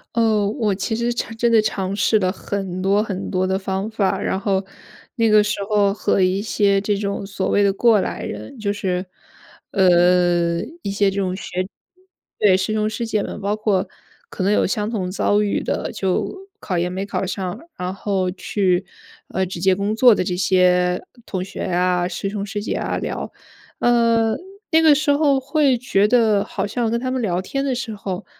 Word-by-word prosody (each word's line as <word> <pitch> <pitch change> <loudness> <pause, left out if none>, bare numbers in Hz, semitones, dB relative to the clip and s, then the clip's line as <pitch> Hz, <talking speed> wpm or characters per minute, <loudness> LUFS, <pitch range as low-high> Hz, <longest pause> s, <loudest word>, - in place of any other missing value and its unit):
呃， 220 -3 +2
我 210 -2 0
其 200 +3 -2
实 235 +1 0
尝 235 -1 -4
真 235 0 +2
的 225 - +6
尝 195 -3 -1
试 210 +2 +3
了 185 -2 +1
很 190 -2 -4
多 200 +2 +3
很 195 -3 -4
多 185 0 +1
的 190 0 +1
方 190 +2 -3
法。 215 -3 0
然 190 - -1
后， 195 -1 0 0.5
那 230 -1 +2
个 210 -1 +5
时 210 0 -1
候 205 -2 +3
和 200 -1 0
一 185 +1 +2
些 200 -1 +2
这 205 +1 0
种 200 -1 -3
所 195 -1 -3
谓 205 - +3
的 200 -1 +3
过 220 0 +4
来 - - -3
人 110 - -7
就 200 -2 -1
是， 185 -3 -2 0.7
呃， 175 -2 +3 0.2
一 200 - -2
些 200 0 +2
这 195 - -5
种 185 -2 -1
学 185 -1 -4 0.7
对， 195 -3 +4
师 190 +3 -1
兄 215 0 +1
师 230 +2 -3
姐 215 -2 0
们， - - -6
包 200 +1 0
括 210 -3 0 0.4
可 185 - -4
能 200 - +3
有 - - +2
相 210 +2 -1
同 190 -6 -2
遭 205 +2 +1
遇 205 -1 0
的， - - -2
就 190 -4 -1 0.3
考 180 - -3
研 175 +1 0
没 190 +2 -4
考 200 - -2
上。 190 +2 -4 0.2
然 180 0 -3
后 195 -2 -1
去， 185 -1 0 0.4
呃， 190 - -1
直 175 -1 -6
接 190 +1 +3
工 200 +3 -1
作 245 +1 +7
的 190 - 0
这 180 0 -2
些 180 -1 +2 0.2
同 185 -2 -3
学 190 - -8
啊、 180 0 +1
师 180 +2 -4
兄 200 0 -4
师 205 0 -4
姐 - - -3
啊 - - -2
聊， - - -4 0.5
呃， 230 -2 +3 0.4
那 320 - +5
个 310 -2 +7
时 300 +1 0
候 285 -2 +3
会 275 0 +2
觉 220 -4 +2
得 220 -3 +3
好 - - -3
像 225 +1 -1
跟 235 - 0
他 255 +1 -3
们 260 - -1
聊 180 -4 0
天 275 +8 -3
的 270 - 0
时 230 -3 -4
候， 195 -1 -5
200 Hz, 215 characters per minute, -21 LUFS, 185-220 Hz, 0.7 s, 作